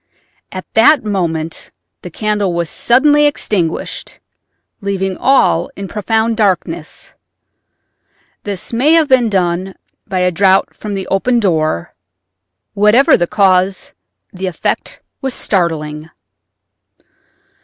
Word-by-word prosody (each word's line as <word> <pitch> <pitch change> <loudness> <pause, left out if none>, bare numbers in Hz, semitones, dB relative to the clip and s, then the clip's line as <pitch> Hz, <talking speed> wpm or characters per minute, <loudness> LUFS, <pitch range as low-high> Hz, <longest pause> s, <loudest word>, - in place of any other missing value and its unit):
At 185 -1 -7
that 230 +3 +5
moment 165 -6 -3 0.3
the 180 - -8
candle 205 -1 -1
was 170 -2 -2
suddenly 295 +4 +3
extinguished, 185 - -3 0.6
leaving 195 -1 -2
all 270 +6 +2
in 195 - -6
profound 220 +2 -1
darkness. 175 -6 -2 1.3
This 200 +2 -6
may 270 +7 +3
have 325 -2 +4
been 255 -4 +3
done 185 -1 -1 0.3
by 190 -3 -1
a 180 0 +2
draught 190 +2 +2
from 210 -2 -6
the 190 -1 -4
opened 235 +4 +1
door; 155 - 0 0.8
whatever 210 +6 +4
the 175 - 0
cause, 190 -1 +1 0.4
the 190 0 -4
effect 180 - -3 0.2
was 265 -2 -2
startling. 160 -5 -2
195 Hz, 110 wpm, -15 LUFS, 175-225 Hz, 1.3 s, that